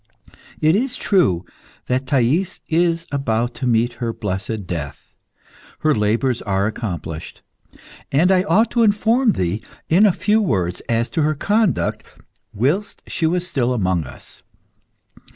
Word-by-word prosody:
It 155 +2 +4
is 255 +4 0
true 95 - +2 0.4
that 130 +1 -1
Thais 140 +9 +1
is 165 0 +1
about 120 -4 -1
to 130 - -3
meet 120 +1 +2
her 115 -1 0
blessed 105 0 -4
death. 80 -6 -6 0.7
Her 155 -1 +3
labours 115 +3 +1
are 95 -1 0
accomplished, 90 -7 -5 0.7
and 165 +7 +3
I 185 -1 +4
ought 220 +3 +3
to 240 - +2
inform 225 +2 +3
thee, 90 +4 -1 0.3
in 190 +6 +6
a - - +4
few 210 +4 +1
words, 90 - -1
as 115 0 +1
to 160 - 0
her 155 +1 +1
conduct 205 +5 +1 0.5
whilst 150 - -1
she 160 - -1
was 175 +2 0
still 130 -7 0
amongst 95 - 0
us. - - -14
135 Hz, 140 wpm, -20 LUFS, 110-180 Hz, 0.7 s, in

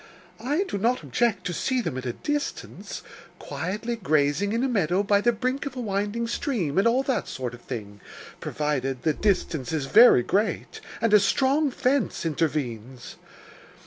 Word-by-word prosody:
I 295 +9 +1
do 205 - -4
not 240 +5 +1
object 225 -6 0
to 180 - -2
see 260 +8 0
them 165 - -3
at 130 0 -4
a 120 - -2
distance, 295 - -4 0.3
quietly 185 +11 -4
grazing 155 0 +1
in 230 +3 0
a - - +2
meadow 195 -5 +1
by 205 0 +3
the 240 - +3
brink 255 +5 -2
of 270 - -7
a - - -5
winding 205 +1 -1
stream, 215 - -1
and 200 - +4
all 250 +3 +3
that 270 -1 -1
sort 125 -2 -5
of 120 - -11
thing, 105 -6 -7 0.4
provided 135 -4 -2
the 155 - +2
distance 165 - 0
is 155 -4 -1
very 210 - +7
great, 205 - -1 0.2
and 230 -2 +2
a 210 - +9
strong 270 +9 +2
fence 255 -6 0
intervenes. 130 -6 -3
200 Hz, 170 wpm, -25 LUFS, 145-240 Hz, 0.4 s, a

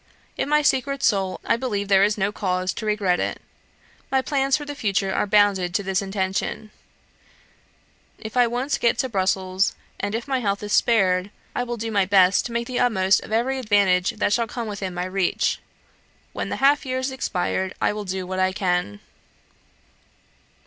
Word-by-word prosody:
In - - -2
my 300 0 +3
secret 275 -1 +1
soul, 195 -4 +1
I - - +3
believe 210 -5 -2
there 195 -1 +5
is 210 +1 +2
no 195 0 0
cause 185 -2 -1
to 220 - -5
regret 200 -4 +1
it. - - -2 0.7
My 265 - +2
plans 275 -1 +1
for 295 - -7
the 290 - -5
future 195 -7 -1
are - - 0
bounded 195 -3 +3
to 200 - +1
this 190 0 0
intention: 195 +2 -3 1.5
if 220 +1 -9
I 245 -1 +5
once 250 +5 -1
get 235 -1 +2
to 260 - -1
Brussels, 190 -2 0 0.2
and 205 +2 -2
if 230 +4 -4
my 265 -2 0
health 200 -3 -1
is 205 - -3
spared, 190 -5 +3 0.2
I - - -1
will 240 -1 -3
do 225 0 -4
my 200 -3 +2
best 190 +1 +4
to - - -10
make 235 0 -2
the 250 0 -3
utmost 190 -5 +3
of - - -11
every 250 +4 0
advantage 200 -5 +2
that 205 - +1
shall 230 0 +1
come 235 +1 -5
within 200 -3 -5
my 180 0 -2
reach. 185 -1 0 0.7
When - - -4
the - - -2
half 280 +2 +3
year 255 -1 -2
is 260 +1 -2
expired, 190 -6 -2
I - - +1
will 210 0 -5
do 185 0 -3
what 185 +1 -4
I 185 0 +2
can. 180 - -1
205 Hz, 190 wpm, -23 LUFS, 190-240 Hz, 1.5 s, there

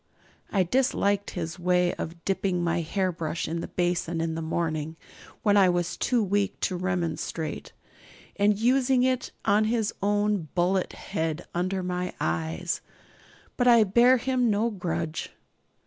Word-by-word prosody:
I 195 -3 +3
disliked 205 -2 +1
his 170 +1 -4
way 180 0 +2
of 170 +1 -7
dipping 190 -2 0
my 170 0 +1
hairbrush 170 -2 -2
in 165 +2 -2
the - - -5
basin 175 -1 -1
in 165 0 -1
the 165 - -3
morning, 160 -1 -2 0.5
when 205 -2 +4
I 190 -2 +6
was 175 -1 0
too 245 -3 +1
weak 200 0 0
to 185 - 0
remonstrate, 170 -3 -3 0.6
and 205 0 +3
using 250 +2 +3
it 255 -1 0
on 210 +1 +4
his 220 -1 0
own 205 -3 +1
bullet 180 +1 +1
head 165 -3 -3
under 185 +2 -1
my 180 0 -3
eyes; 80 0 -2 0.8
but 245 - +2
I 235 -2 +7
bear 240 +6 +5
him 250 0 +1
no 215 +3 +1
grudge. 170 -5 -3
185 Hz, 145 wpm, -27 LUFS, 170-210 Hz, 0.8 s, I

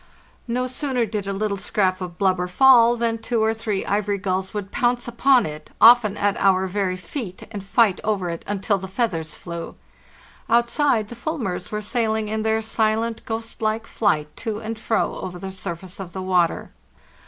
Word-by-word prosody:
No 250 +2 0
sooner 255 -1 -1
did 210 -2 -4
a - - -1
little 200 0 -1
scrap 190 -1 0
of 175 -1 -6
blubber 185 -2 +1
fall 240 +3 +6
than 230 -1 0
two 225 -1 0
or 220 0 +2
three 220 -3 -3
ivory 205 0 0
gulls 190 -1 -2
would 205 -2 -5
pounce 240 0 0
upon 250 +2 +4
it, 150 0 -7
often 230 -3 +7
at 205 -1 +1
our 190 -1 +3
very 185 -1 -1
feet, 185 - -6
and 205 -3 -6
fight 200 0 +2
over 200 -4 0
it 170 - -6
until 200 0 0
the 190 - -6
feathers 185 -6 -2
flew. 170 -1 -7 0.7
Outside 235 -1 +2
the 240 - -8
fulmars 235 - -3
were 210 0 -3
sailing 220 -1 0
in 220 0 -1
their 220 0 +1
silent, 220 +1 0
ghost 225 0 -5
like 220 +1 0
flight 150 -11 0
to 220 -3 -3
and 220 0 -5
fro 220 0 0
over 180 -1 -6
the 190 +2 -6
surface 185 0 -7
of 185 -3 -7
the 190 - -4
water. 180 -2 +1
210 Hz, 180 wpm, -23 LUFS, 190-230 Hz, 0.7 s, often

